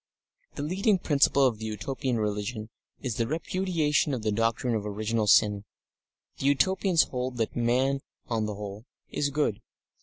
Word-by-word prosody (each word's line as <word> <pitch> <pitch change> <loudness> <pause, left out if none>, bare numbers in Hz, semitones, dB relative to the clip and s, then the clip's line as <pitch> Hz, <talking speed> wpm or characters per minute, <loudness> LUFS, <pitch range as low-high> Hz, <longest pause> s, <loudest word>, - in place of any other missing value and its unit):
The - - -4
leading 190 +6 +2
principle 140 -4 +3
of 115 -5 +1
the 110 - -5
Utopian 120 +4 -2
religion 105 +1 -3 0.3
is 125 -6 -2
the 115 - 0
repudiation 160 -2 0
of 115 - -6
the 110 - +1
doctrine 115 +3 0
of 110 -2 -1
original 105 +1 -1
sin; 105 0 +4 0.8
the 135 - 0
Utopians 175 +5 +3
hold 125 -1 -4
that 115 -2 -1
man, 125 +3 +2 0.3
on 110 -3 -1
the 105 - -4
whole, 105 +3 -8 0.2
is 145 - 0
good. 140 -7 0
120 Hz, 155 wpm, -28 LUFS, 110-145 Hz, 0.8 s, sin